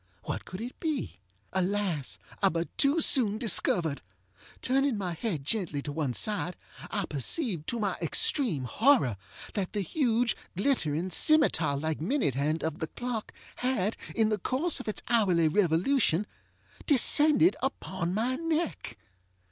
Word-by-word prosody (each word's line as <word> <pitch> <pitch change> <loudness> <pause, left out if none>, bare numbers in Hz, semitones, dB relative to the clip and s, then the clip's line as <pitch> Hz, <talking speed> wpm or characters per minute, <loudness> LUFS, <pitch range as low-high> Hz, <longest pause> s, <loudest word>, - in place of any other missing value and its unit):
What - - -5
could 185 +3 -8
it 245 +2 -7
be? 310 - -3 0.3
Alas! 190 -6 -1 0.2
I 195 - +4
but 170 -1 -4
too 290 +4 +3
soon 220 -8 +4
discovered. 175 - +1 0.6
Turning 270 -2 +1
my 185 -3 -3
head 170 - -3
gently 170 -5 0
to 145 - -5
one 145 -5 -2
side, 180 -5 -1 0.3
I 200 -3 -2
perceived, 165 - 0
to 235 - -2
my 200 -3 0
extreme 170 - +1
horror, 215 - +2 0.4
that 195 -4 -3
the 205 - -1
huge, 240 - +1 0.2
glittering, 185 - 0
scimetar 175 - +4
like 155 0 -3
minute 200 - 0
hand 150 +5 -1
of 160 -1 -3
the 160 - -3
clock 240 +1 -5 0.3
had, 235 -5 -1 0.2
in 220 -1 +2
the 215 -1 -1
course 275 - 0
of 255 - -9
its 215 - -1
hourly 190 -9 +3
revolution, 185 - +2 0.6
descended 300 +4 +5
upon 190 -10 -3
my 235 +6 -1
neck. 330 - -3
205 Hz, 140 wpm, -28 LUFS, 165-255 Hz, 0.6 s, descended